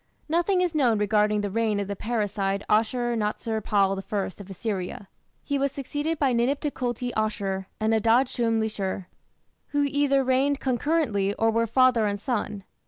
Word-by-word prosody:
Nothing 345 Hz, +4 st, +2 dB
is 355 Hz, -2 st, 0 dB
known 250 Hz, -8 st, +3 dB
regarding 210 Hz, 0 st, +2 dB
the 205 Hz, -1 st, -3 dB
reign 220 Hz, -1 st, +1 dB
of 200 Hz, -, -2 dB
the 200 Hz, -, -3 dB
parricide 205 Hz, -3 st, -1 dB
Ashur 240 Hz, +2 st, +1 dB
natsir 220 Hz, 0 st, -2 dB
pal 195 Hz, -2 st, +2 dB
I 205 Hz, -2 st, 0 dB
of 200 Hz, -, -12 dB
Assyria. 195 Hz, -1 st, -4 dB, 0.4 s
He 285 Hz, -1 st, -1 dB
was 280 Hz, 0 st, +1 dB
succeeded 290 Hz, +4 st, -3 dB
by 275 Hz, -4 st, +2 dB
Ninip 245 Hz, +4 st, +1 dB
Tukulti 250 Hz, -4 st, -2 dB
Ashur 195 Hz, -3 st, -1 dB
and 220 Hz, +1 st, +1 dB
Adad 230 Hz, +4 st, +4 dB
shum 230 Hz, -2 st, 0 dB
lishir, 200 Hz, -4 st, -2 dB, 0.6 s
who 290 Hz, 0 st, 0 dB
either 280 Hz, -1 st, +2 dB
reigned 265 Hz, +2 st, +2 dB
concurrently 245 Hz, -7 st, 0 dB
or 225 Hz, 0 st, +2 dB
were 230 Hz, +1 st, +1 dB
father 245 Hz, -2 st, +4 dB
and 205 Hz, 0 st, -2 dB
son. 210 Hz, -4 st, -3 dB
225 Hz, 165 wpm, -26 LUFS, 205-270 Hz, 0.6 s, Adad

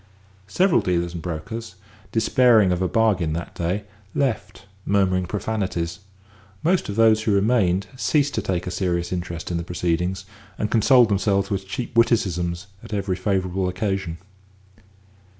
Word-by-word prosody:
Several 180 Hz, -, +3 dB
dealers 85 Hz, -3 st, -1 dB
and 85 Hz, -, -5 dB
brokers, 90 Hz, +6 st, -6 dB, 0.4 s
despairing 115 Hz, -3 st, +4 dB
of 90 Hz, 0 st, 0 dB
a 95 Hz, -, +2 dB
bargain 95 Hz, -5 st, +2 dB
that 85 Hz, +1 st, -5 dB
day, 90 Hz, +5 st, -2 dB, 0.3 s
left, 135 Hz, -7 st, -2 dB, 0.2 s
murmuring 95 Hz, -2 st, +1 dB
profanities; 95 Hz, -4 st, -2 dB, 0.6 s
most 180 Hz, -, +1 dB
of 100 Hz, -, -3 dB
those 110 Hz, -1 st, +5 dB
who 110 Hz, -1 st, 0 dB
remained 100 Hz, -3 st, +2 dB
ceased 145 Hz, +2 st, +1 dB
to -, -, -1 dB
take 90 Hz, -2 st, -2 dB
a 90 Hz, -, -4 dB
serious 85 Hz, -2 st, -1 dB
interest 85 Hz, -1 st, -4 dB
in 85 Hz, -, -1 dB
the 85 Hz, -, -3 dB
proceedings, 90 Hz, +2 st, -2 dB, 0.3 s
and 105 Hz, -, -2 dB
consoled 120 Hz, +1 st, +5 dB
themselves 100 Hz, 0 st, +1 dB
with 95 Hz, -1 st, -2 dB
cheap 120 Hz, +3 st, -5 dB
witticisms 90 Hz, -7 st, +1 dB, 0.2 s
at -, -, -9 dB
every 100 Hz, -2 st, -1 dB
favourable 95 Hz, -1 st, -1 dB
occasion. 95 Hz, -3 st, -2 dB
95 Hz, 145 wpm, -23 LUFS, 90-110 Hz, 0.6 s, those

